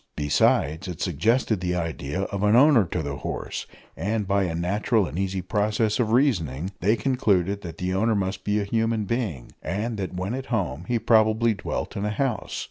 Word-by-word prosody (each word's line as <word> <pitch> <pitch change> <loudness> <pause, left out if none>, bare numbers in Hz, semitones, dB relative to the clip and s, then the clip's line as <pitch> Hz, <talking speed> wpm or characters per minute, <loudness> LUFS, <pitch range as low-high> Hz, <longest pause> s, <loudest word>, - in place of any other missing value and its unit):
Besides, 75 +3 +2
it 90 -2 -6
suggested 105 - +1
the 90 0 -1
idea 80 -1 -3
of 100 0 -3
an 105 +1 +4
owner 130 -4 +6
to 80 -2 -3
the 70 -1 -4
horse; - - -5 0.3
and 105 0 -2
by 100 0 +2
a 85 -2 -2
natural 100 +5 +1
and 85 - -5
easy 95 -1 -2
process 105 +3 0
of 110 -3 +1
reasoning 95 - +1
they 105 +5 +3
concluded 100 -5 +1
that 85 -3 -8
the 90 0 -2
owner 110 +4 +2
must 95 0 -2
be 105 +1 +1
a - - 0
human 115 0 0
being, 100 - -3
and 105 +6 -3
that, 95 -2 -4
when 95 +5 -3
at 135 +1 -5
home, 90 - -2
he 120 - +1
probably 110 0 +3
dwelt 100 - -4
in 100 - -3
a 105 - 0
house. 110 -1 -2
100 Hz, 195 wpm, -25 LUFS, 90-110 Hz, 0.3 s, owner